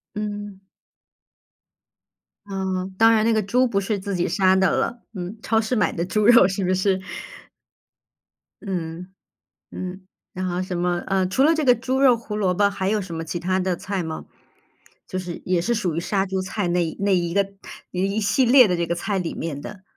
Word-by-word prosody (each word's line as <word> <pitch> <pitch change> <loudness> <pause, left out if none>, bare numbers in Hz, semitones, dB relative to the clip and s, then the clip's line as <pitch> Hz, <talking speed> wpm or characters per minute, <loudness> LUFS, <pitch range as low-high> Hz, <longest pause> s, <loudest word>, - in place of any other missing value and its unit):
嗯。 205 -2 -5 1.9
啊， 195 -1 -4 0.3
当 225 0 +6
然 215 -1 +3
那 230 - +3
个 215 -1 +2
猪 250 +6 +2
不 200 -4 0
是 200 0 -2
自 195 0 -4
己 175 - 0
杀 190 -1 +3
的 190 0 +3
了， 240 0 -1
嗯， 185 +3 -6
超 225 0 +2
市 225 +3 -1
买 215 - +2
的 170 - -2
猪 210 +2 0
肉 235 -5 +7
是 195 0 -2
不 185 - +1
是？ 190 0 +1 1.6
嗯， 180 -2 -5 0.6
嗯， 185 +1 -7 0.3
然 185 +1 -3
后 180 +1 -2
什 185 -1 -4
么， 175 0 0
呃， 190 -1 +1
除 260 +9 +2
了 320 +2 +5
这 310 - 0
个 250 -2 +6
猪 260 +3 -1
肉 250 -4 +6
胡 220 -2 -7
萝 190 -4 +1
卜 200 +2 +3
还 190 -1 -2
有 215 0 +1
什 175 -3 -7
么 165 - -3
其 170 +2 -4
它 185 +2 0
的 180 -2 -1
菜 195 -3 -3
吗？ 160 -1 -6 0.8
就 185 - -4
是 175 -2 -6
也 180 -2 +1
是 235 +6 0
属 185 -8 -1
于 - - 0
杀 195 +1 0
猪 190 0 -2
菜 185 0 -2
那 175 -1 +1
一 160 - -6
那 200 -1 +2
一 170 -1 -2
个 200 -1 +2 0.4
一 195 +3 -1
系 245 +5 +2
列 250 -1 +7
的 180 - +1
这 170 0 -1
个 170 - -1
菜 195 +2 -2
里 170 - -3
面 145 -3 -5
的。 195 +2 -9
190 Hz, 220 characters per minute, -23 LUFS, 180-215 Hz, 1.9 s, 肉